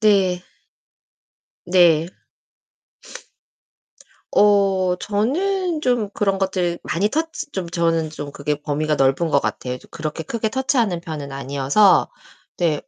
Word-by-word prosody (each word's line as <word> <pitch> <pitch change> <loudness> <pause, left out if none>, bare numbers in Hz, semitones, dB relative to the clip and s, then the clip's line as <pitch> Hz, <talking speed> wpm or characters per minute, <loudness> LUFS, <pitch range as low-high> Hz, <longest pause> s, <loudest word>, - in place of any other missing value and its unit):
네. 190 -4 +3 1.2
네. 170 -3 +4 2.2
어 195 -3 +3
저는 325 - -1
좀 245 -7 +1
그런 195 -2 0
것들 185 -3 -1
많이 195 +6 0
터치 320 +3 -3
좀 185 -3 -4
저는 165 -2 0
좀 145 -2 -7
그게 150 +1 -3
범위가 150 +1 -1
넓은 135 +5 +2
것 140 -1 +3
같아요. 125 0 -3
그렇게 155 0 -5
크게 225 +3 -2
터치하는 235 -7 0
편은 155 -4 -6
아니어서 140 +8 +3 0.5
네. 160 -4 +1
180 Hz, 210 characters per minute, -21 LUFS, 155-210 Hz, 2.2 s, 네